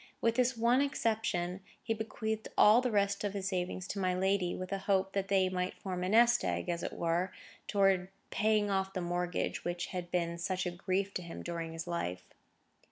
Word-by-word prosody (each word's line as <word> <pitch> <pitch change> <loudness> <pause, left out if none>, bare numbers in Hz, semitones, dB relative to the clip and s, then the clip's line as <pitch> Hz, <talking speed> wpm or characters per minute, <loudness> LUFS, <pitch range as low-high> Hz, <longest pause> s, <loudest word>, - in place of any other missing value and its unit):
With 230 - +2
this 250 +1 +2
one 240 +3 +4
exception, 215 -9 0 0.2
he 225 - 0
bequeathed 220 0 -3
all 215 +4 +7
the 255 - 0
rest 200 -2 +1
of 205 -1 -2
his 195 -1 -2
savings 185 0 -2
to 200 - -3
my 185 -1 +1
lady, 190 -1 +1
with 185 +1 -6
a 195 - -1
hope 195 -1 +1
that 195 -1 -1
they 195 -1 +3
might 185 0 -2
form 180 -2 -4
a 185 - -1
nest 240 +3 +5
egg, - - -1
as 170 0 -1
it - - -4
were, 170 +3 0 0.4
towards 195 -3 +3
the - - -20 0.2
paying 210 -1 +2
off 190 0 +1
of 190 - -21
the 185 - -2
mortgage 175 0 -2
which 175 0 -2
had 180 -1 -4
been 170 -1 -1
such 185 +1 -1
a 180 - -1
grief 190 +2 -1
to - - -2
him 170 -1 -8
during 165 -1 -4
his 165 0 -5
life. 90 - -3
190 Hz, 215 wpm, -32 LUFS, 180-205 Hz, 0.4 s, all